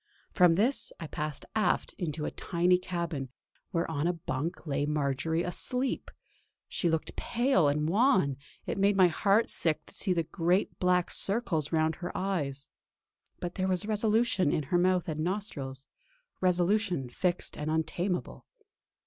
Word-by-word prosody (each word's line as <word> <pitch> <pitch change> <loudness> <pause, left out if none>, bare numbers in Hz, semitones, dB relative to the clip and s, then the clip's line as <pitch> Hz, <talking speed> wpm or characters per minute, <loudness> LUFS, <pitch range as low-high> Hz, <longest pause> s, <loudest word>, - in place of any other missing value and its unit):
From 180 -3 +5
this 235 +9 +2
I 165 - -5
passed 150 -1 -4
aft 215 - +1
into 155 -4 -2
a - - -2
tiny 180 +1 +1
cabin, 170 -7 -3 0.4
where 170 -2 -1
on 160 0 -1
a 175 - +2
bunk 165 -1 -4
lay 145 -1 -1
Marjory 150 +3 0
asleep. 250 +8 -1 0.6
She 175 - 0
looked 160 -1 -2
pale 240 - +2
and 150 +1 +1
wan; 190 - +3 0.3
it - - -3
made 200 +1 +4
my 185 -2 +6
heart 200 +6 +2
sick 155 -2 +1
to - - -16
see 195 - -1
the 170 -2 +2
great 175 +4 0
black 180 -1 +2
circles 195 -8 0
round 160 -1 +1
her 175 - -5
eyes. 145 -8 -2 0.7
But 175 -1 -4
there 185 -1 -1
was 185 +1 0
resolution 215 -5 +2
in 155 - 0
her 175 +6 +1
mouth 180 0 +2
and 155 -2 -3
nostrils; 155 -7 -3 0.5
resolution 180 - +1
fixed 175 +8 -1
and 150 +1 -4
untameable. 175 +3 -2
175 Hz, 150 wpm, -30 LUFS, 155-190 Hz, 0.7 s, my